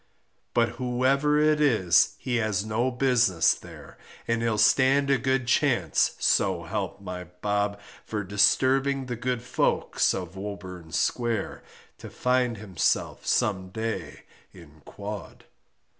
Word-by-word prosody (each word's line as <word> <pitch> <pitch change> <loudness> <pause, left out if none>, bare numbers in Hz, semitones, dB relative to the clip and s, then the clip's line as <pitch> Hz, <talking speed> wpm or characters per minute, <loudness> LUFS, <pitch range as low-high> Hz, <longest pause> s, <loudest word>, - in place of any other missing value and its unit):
But 115 -1 +3
whoever 135 +4 +1
it 150 0 +3
is 110 - +3
he 125 -2 -2
has 110 -3 -1
no 115 +4 0
business 125 -9 +3
there, - - -13 0.3
And 115 0 0
he'll 115 -2 0
stand 135 +5 +4
a 135 - +3
good 130 -1 0
chance, 120 - +1
so - - +1
help - - -4
my 90 -2 -6
bob, 100 +3 -2 0.2
For 105 -1 -4
disturbing 130 +7 +2
the 125 -1 -4
good 120 0 -3
folks 125 - 0
of 90 -1 -6
Woburn 95 -4 -8
Square, 115 +2 -1 0.4
To - - -9
find 125 -2 0
himself 95 -6 -1
some 95 -3 0
day 110 -6 -5 0.3
in 80 -4 -16
quod. 105 -1 -8
115 Hz, 130 wpm, -26 LUFS, 95-130 Hz, 0.4 s, stand